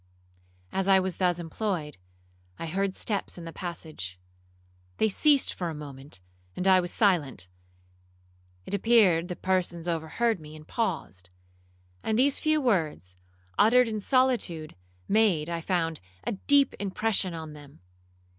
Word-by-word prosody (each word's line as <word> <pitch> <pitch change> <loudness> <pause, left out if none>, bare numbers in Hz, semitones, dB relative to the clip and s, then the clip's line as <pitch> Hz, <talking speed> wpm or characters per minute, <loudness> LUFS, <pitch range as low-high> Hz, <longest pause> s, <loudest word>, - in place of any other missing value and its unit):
As 190 0 -1
I 195 -1 +6
was 185 -1 -2
thus 180 -2 +2
employed, 165 - -3 0.6
I - - -5
heard 190 +3 -1
steps 200 -4 -2
in 170 - -8
the 165 - -8
passage. 155 - -6 0.8
They - - +3
ceased 280 +7 +3
for 175 -2 -3
a 160 - -5
moment, 140 -7 -10 0.3
and 185 - -1
I 190 -1 +7
was 175 -1 -2
silent. 155 - +1 1.2
It - - -6
appeared 200 -5 +4
the 180 - -4
persons 175 -3 -1
overheard 175 +7 0
me, 155 0 -11
and 155 0 -13
paused; 160 - -3 0.7
and 220 - 0
these 270 +3 +3
few 310 0 +2
words, 160 - -1 0.4
uttered 245 +3 +6
in 215 -1 -2
solitude, 230 - +1 0.3
made, 195 -8 +2
I 170 -1 -2
found, 165 -3 -1 0.2
a - - -2
deep 280 +6 +3
impression 200 -2 0
on 160 -2 -7
them. 145 - -14
180 Hz, 140 wpm, -27 LUFS, 160-215 Hz, 1.2 s, I